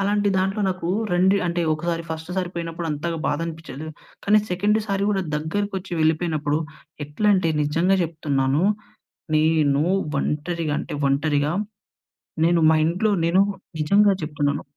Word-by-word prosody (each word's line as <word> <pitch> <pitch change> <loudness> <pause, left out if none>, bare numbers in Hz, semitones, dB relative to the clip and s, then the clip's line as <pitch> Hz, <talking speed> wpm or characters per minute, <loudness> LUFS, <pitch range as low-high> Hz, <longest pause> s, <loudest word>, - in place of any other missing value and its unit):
అలాంటి 205 +1 +1
దాంట్లో 195 +3 0
నాకు 185 -2 -3 0.2
రెండు 185 +2 +4
అంటే 170 0 -1
ఒకసారి 165 +1 -2
ఫస్ట్ 160 +2 -5
సారి 180 -2 -1
పోయినప్పుడు 165 0 -4
అంతగా 160 +3 -3
బాధ 145 - 0
అనిపించదు. 160 -2 -7 0.4
కానీ, 210 +1 +5
సెకండ్ 205 +4 +2
సారి 200 -1 0
కూడా 195 -2 0
దగ్గరకొచ్చి 190 +4 -3
వెళ్ళిపోయినప్పుడు 155 -2 +1 0.5
ఎట్లా 150 +9 -1
అంటే, 175 -4 +1
నిజంగా 165 +6 +2
చెప్తున్నాను. 145 -3 0 0.7
నేను 155 -2 +3 0.4
ఒంటరిగా 155 0 -2
అంటే, - - -6
ఒంటరిగా 145 +1 +1 0.9
నేను 170 0 +3
మా 160 - +4
ఇంట్లో 185 +6 +1
నేను 175 +3 +3 0.4
నిజంగా 200 +7 +4
చెప్తున్నాను 145 -2 -1
165 Hz, 130 wpm, -23 LUFS, 150-190 Hz, 0.9 s, కానీ